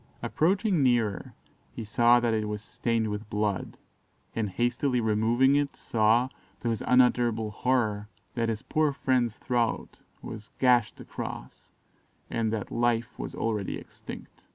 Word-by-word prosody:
Approaching 190 +1 +2
nearer 115 -7 +1 0.4
he - - -5
saw 120 +3 +4
that 120 -1 +1
it 110 -1 0
was 105 0 -4
stained 115 -1 -1
with 105 +1 -5
blood, 105 -2 -2 0.6
and 110 -3 -1
hastily 120 +4 0
removing 115 +5 +3
it, 145 -1 0
saw, 115 +2 +2 0.3
to 120 - -1
his 115 - -1
unutterable 120 -3 +3
horror, 110 -4 0 0.2
that 115 -2 0
his 110 -1 -3
poor 155 -2 +1
friend's 125 -4 0
throat 120 -3 -1 0.2
was 110 -1 -8
gashed 125 -3 +3
across, - - -8 0.6
and 115 -1 0
that 110 -3 -3
life 120 -1 0
was - - -5
already 110 -4 -2
extinct. - - -11
115 Hz, 135 wpm, -28 LUFS, 110-125 Hz, 0.6 s, saw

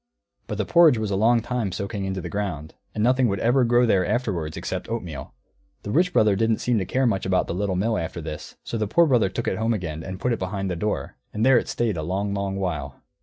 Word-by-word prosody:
But - - -4
the - - -1
porridge 165 -7 +6
was 110 -2 -2
a - - +1
long 115 +4 +4
time 120 -5 -2
soaking 100 +2 -4
into 95 -1 -3
the - - -5
ground, 90 -7 -4 0.2
and 105 - 0
nothing 125 +1 +3
would 100 -2 -1
ever 125 +3 +3
grow 120 +1 +4
there 100 -5 +3
afterwards 90 -12 -2
except 90 +2 -4
oatmeal. 90 -10 -5 0.5
The 100 - -4
Rich 180 - +3
Brother 105 - +4
didn't 110 +2 +2
seem 120 -3 +1
to 95 - -2
care 130 +8 +1
much 100 -6 +1
about 95 -1 +1
the - - -4
Little 95 +1 -1
Mill 110 +5 0
after 85 +1 -4
this, 80 -2 -7
so 115 - -4
the 110 - 0
Poor 170 +11 +4
Brother 120 -9 +3
took - - -4
it 95 - -1
home 115 +1 +1
again 80 -5 -4
and 95 +2 -7
put 125 +4 0
it 115 - -3
behind 95 0 -3
the - - -2
door; 105 +5 -3 0.2
and 110 +2 0
there 130 -2 +6
it - - -6
stayed 115 -6 -1
a - - -2
long, 95 +5 -2
long 100 -1 -2
while. 90 -6 -3
100 Hz, 255 wpm, -24 LUFS, 95-115 Hz, 0.5 s, porridge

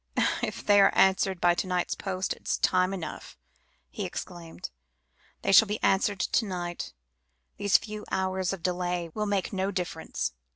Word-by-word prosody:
"If - - -4
they 205 -1 +6
are - - +6
answered 190 -1 +3
by 175 0 +4
to 180 - -2
night's 180 -1 0
post, 190 -1 -2
it - - -17
is - - +1
time 185 0 +2
enough," 180 -5 -7 0.5
he - - -6
exclaimed. 170 - -7 0.7
"They - - +2
shall 215 +3 +8
be 210 +1 -2
answered 195 0 +2
to 225 - +1
night; 175 -3 -5 0.6
these 205 -1 +4
few 215 -1 -7
hours 190 -1 -1
of 190 -4 -6
delay 180 -2 -1
will 210 0 -2
make 200 0 -1
no 190 0 0
difference." 175 - -3
185 Hz, 165 wpm, -28 LUFS, 180-200 Hz, 0.7 s, shall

